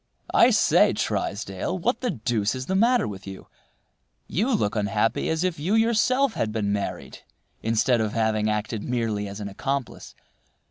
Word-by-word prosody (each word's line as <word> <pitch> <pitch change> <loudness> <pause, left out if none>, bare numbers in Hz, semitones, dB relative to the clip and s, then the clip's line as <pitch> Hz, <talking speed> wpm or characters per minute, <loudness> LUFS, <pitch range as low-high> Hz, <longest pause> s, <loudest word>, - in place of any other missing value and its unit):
"I - - +6
say, - - +4
Trysdale, 100 - -2
what 230 +8 -1
the 250 - 0
deuce 115 - -1
is 130 0 -5
the 190 - -2
matter 235 +5 +3
with 100 -1 -8
you? 95 -1 -8 0.8
You 220 - 0
look 105 - -1
unhappy 105 +1 0
as 160 +1 0
if 180 -4 -1
you 180 +9 0
yourself 235 +3 +2
had 110 - -2
been 105 -2 -1
married 100 -1 -4 0.4
instead 115 +2 +2
of 105 -1 -2
having 110 -1 +1
acted 105 0 -2
merely 115 -4 -2
as 100 +1 -7
an 100 - -5
accomplice. 135 +6 -4
115 Hz, 165 wpm, -25 LUFS, -, 0.8 s, I